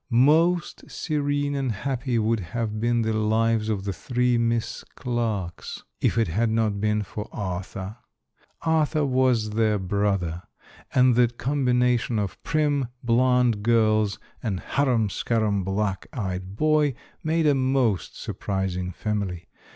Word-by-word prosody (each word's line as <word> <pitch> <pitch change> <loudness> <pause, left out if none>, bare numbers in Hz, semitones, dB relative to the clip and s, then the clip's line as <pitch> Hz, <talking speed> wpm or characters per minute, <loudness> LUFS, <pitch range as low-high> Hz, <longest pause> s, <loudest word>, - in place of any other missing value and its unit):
Most 155 +8 +3
serene 145 -2 -1
and 135 -3 -1
happy 125 +3 -2
would 110 0 +1
have 110 +4 -3
been 120 +1 +1
the 110 0 0
lives 110 +1 +1
of 100 -3 -1
the 100 -1 -2
three 125 +6 0
Miss 115 -1 0
Clarkes, 110 -9 -3 0.2
if - - +1
it 115 - +3
had 110 +8 +1
not 110 -3 0
been 105 0 +1
for 105 +2 -7
Arthur. 95 +2 -5 0.7
Arthur 155 -2 +2
was 130 -5 +2
their 110 -1 +2
brother, 95 -3 -1 0.5
and 125 -1 +5
the 120 +1 +5
combination 125 -2 +1
of 100 -4 -3
prim, 145 -4 +1 0.2
blonde 125 -2 +3
girls 110 -2 +2 0.2
and 100 -6 -2
harum 125 -6 +1
scarum 105 -1 0
black 95 0 -2
eyed 95 -4 -4
boy, 150 0 +2 0.3
made 160 +1 +1
a 145 - +5
most 130 -7 0
surprising 95 -2 -3
family. 95 -4 -3
115 Hz, 130 wpm, -25 LUFS, 105-130 Hz, 0.7 s, and